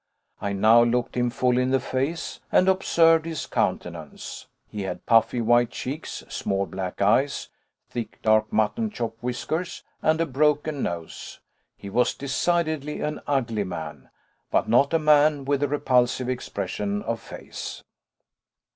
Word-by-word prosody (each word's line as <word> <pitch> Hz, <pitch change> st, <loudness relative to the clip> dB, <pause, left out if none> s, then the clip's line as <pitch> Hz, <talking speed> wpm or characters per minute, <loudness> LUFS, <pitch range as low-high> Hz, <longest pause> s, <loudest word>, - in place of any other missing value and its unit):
I 100 Hz, -, -1 dB
now 110 Hz, +4 st, +6 dB
looked 120 Hz, +1 st, +1 dB
him 120 Hz, -1 st, +1 dB
full 125 Hz, +1 st, +1 dB
in 125 Hz, 0 st, +1 dB
the 135 Hz, 0 st, +3 dB
face 135 Hz, +6 st, -3 dB
and 185 Hz, -, +4 dB
observed 165 Hz, -4 st, +4 dB
his 160 Hz, -3 st, -4 dB
countenance. 80 Hz, -4 st, -3 dB, 0.2 s
He 105 Hz, -, -6 dB
had 90 Hz, -2 st, -5 dB
puffy 115 Hz, +1 st, +3 dB
white 120 Hz, +1 st, +4 dB
cheeks, 145 Hz, +5 st, -6 dB
small 100 Hz, 0 st, -1 dB
black 95 Hz, 0 st, -4 dB
eyes, 130 Hz, +7 st, +2 dB, 0.4 s
thick 120 Hz, -2 st, -6 dB
dark 110 Hz, 0 st, +3 dB
mutton 110 Hz, -, +1 dB
chop 115 Hz, -, -4 dB
whiskers, 155 Hz, +8 st, -3 dB, 0.2 s
and 160 Hz, +1 st, +2 dB
a 165 Hz, -, +2 dB
broken 150 Hz, +1 st, +1 dB
nose. 85 Hz, -2 st, -5 dB, 0.4 s
He 100 Hz, -, -9 dB
was 125 Hz, +4 st, +2 dB
decidedly 150 Hz, +1 st, -1 dB
an 150 Hz, -, -3 dB
ugly 120 Hz, -7 st, 0 dB
man, 80 Hz, -6 st, -7 dB, 0.4 s
but -, -, +1 dB
not 130 Hz, +5 st, +4 dB
a 165 Hz, -, +4 dB
man 150 Hz, -2 st, +4 dB
with 140 Hz, 0 st, +1 dB
a 145 Hz, -, +2 dB
repulsive 125 Hz, -3 st, +1 dB
expression 100 Hz, -4 st, -3 dB
of 115 Hz, -1 st, -2 dB
face. -, -, -8 dB
125 Hz, 145 wpm, -25 LUFS, 110-150 Hz, 0.4 s, now